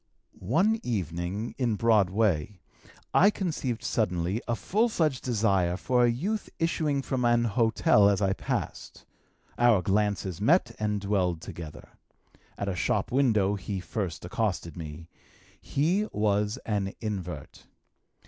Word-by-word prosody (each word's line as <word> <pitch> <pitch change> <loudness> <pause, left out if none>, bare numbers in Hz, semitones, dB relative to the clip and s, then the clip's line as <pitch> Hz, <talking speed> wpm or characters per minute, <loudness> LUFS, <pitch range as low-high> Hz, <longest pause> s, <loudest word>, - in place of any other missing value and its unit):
One 185 - +2
evening, 95 - -3
in 120 -4 +1
Broadway, 105 -4 +2 0.5
I 200 - +6
conceived 145 - -3
suddenly 95 -3 0
a 120 - 0
full 210 - +1
fledged 155 - 0
desire 100 -7 +1
for 125 +4 +2
a 120 - +5
youth 195 - -2
issuing 155 -4 0
from 130 -2 -2
an 120 0 +3
hotel 110 -2 +3
as 100 -2 +1
I 95 -2 +2
passed. - - -5 0.5
Our 120 -6 +4
glances 100 -2 0
met 120 - +3
and 105 -1 0
dwelled 95 -4 0
together. 80 -1 -9 0.7
At 100 - -3
a 95 - -1
shop 85 - 0
window 110 -7 +3
he 100 0 -4
first 90 -2 -4
accosted 95 - -2
me. 80 0 -8 0.5
He 180 +9 0
was 105 0 0
an 100 -3 -2
invert. 90 - -6
105 Hz, 130 wpm, -28 LUFS, 95-125 Hz, 0.7 s, I